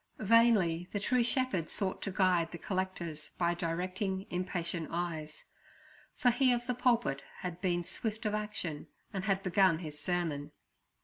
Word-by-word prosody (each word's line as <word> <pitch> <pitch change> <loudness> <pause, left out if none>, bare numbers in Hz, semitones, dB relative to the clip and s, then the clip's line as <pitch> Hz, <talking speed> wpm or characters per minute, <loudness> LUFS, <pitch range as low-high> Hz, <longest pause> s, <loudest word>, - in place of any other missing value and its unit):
Vainly 210 -6 +4
the 205 - -1
true 245 +4 +2
shepherd 240 - 0
sought 190 -2 -1
to 195 - -3
guide 185 -4 +2
the 170 - -6
collectors 175 -5 -3
by 170 -1 +2
directing, 185 +3 -2
impatient 175 -2 -2
eyes; 165 -3 -4 0.7
for 245 - +4
he 255 +1 +4
of 240 0 0
the 250 - 0
pulpit 235 - +1 0.2
had 180 -1 -5
been 175 -2 0
swift 220 +3 -4
of 210 - +1
action 210 -8 -3 0.3
and 190 0 -3
had 195 -2 +1
begun 185 -2 +4
his 155 -3 -7
sermon. 155 -5 -2
185 Hz, 150 wpm, -32 LUFS, 170-210 Hz, 0.7 s, Vainly